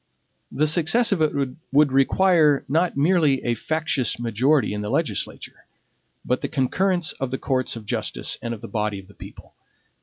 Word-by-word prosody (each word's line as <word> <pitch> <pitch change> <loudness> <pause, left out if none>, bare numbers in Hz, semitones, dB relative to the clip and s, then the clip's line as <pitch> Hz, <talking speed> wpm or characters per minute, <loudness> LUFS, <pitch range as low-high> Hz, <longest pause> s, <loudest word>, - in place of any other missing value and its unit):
The 155 - +1
success 175 +10 +2
of 190 -5 +1
it 155 - +3 0.4
would 145 0 +4
require 150 +2 +3
not 165 +3 0
merely 150 -3 +2
a 120 - 0
factious 150 -1 -1
majority 120 +4 +1
in 105 - -4
the 105 - -4
legislature, 130 - -3 0.6
but 125 - -1
the - - -2
concurrence 175 +5 0
of 135 - -2
the 130 - -3
courts 130 -2 -1
of 115 -2 -9
justice - - -2
and 115 - -4
of 115 -2 -6
the - - -8
body 105 -2 -2
of 95 -1 -11
the 100 - -17
people. - - -13
140 Hz, 175 wpm, -23 LUFS, 120-160 Hz, 0.6 s, would